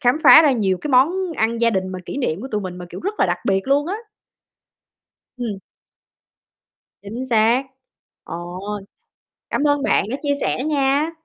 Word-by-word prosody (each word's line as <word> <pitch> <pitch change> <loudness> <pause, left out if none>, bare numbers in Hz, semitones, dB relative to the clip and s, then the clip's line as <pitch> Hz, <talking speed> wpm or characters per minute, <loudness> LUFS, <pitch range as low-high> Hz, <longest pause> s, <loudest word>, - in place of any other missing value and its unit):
khám 250 +3 +2
phá 270 +5 +10
ra 290 -3 +4
nhiều 195 -6 0
cái - - -5
món 335 +8 +3
ăn 230 +1 0
gia 230 0 +4
đình 190 -2 -1
mà 185 0 -5
kỷ - - -5
niệm 195 - -1
của 265 - -6
tụi 210 -3 -2
mình 185 -2 -6
mà, 180 - -8
kiểu, - - -8
rất 405 +4 -3
là - - +4
đặc - - -1
biệt 195 -1 0
luôn 285 +2 +2
á. 375 - -2 1.4
Ừm. 220 -6 -4 1.4
Chính 235 +6 -6
xác. 230 +4 +3 0.6
Ồ! 175 +2 -7 0.9
Cảm 290 - 0
ơn 290 -1 +2
bạn - - +2
đã 265 - -1
chia 285 -1 +1
sẻ 260 - -1
nha! 290 +1 +1
245 Hz, 180 wpm, -21 LUFS, 200-285 Hz, 1.4 s, phá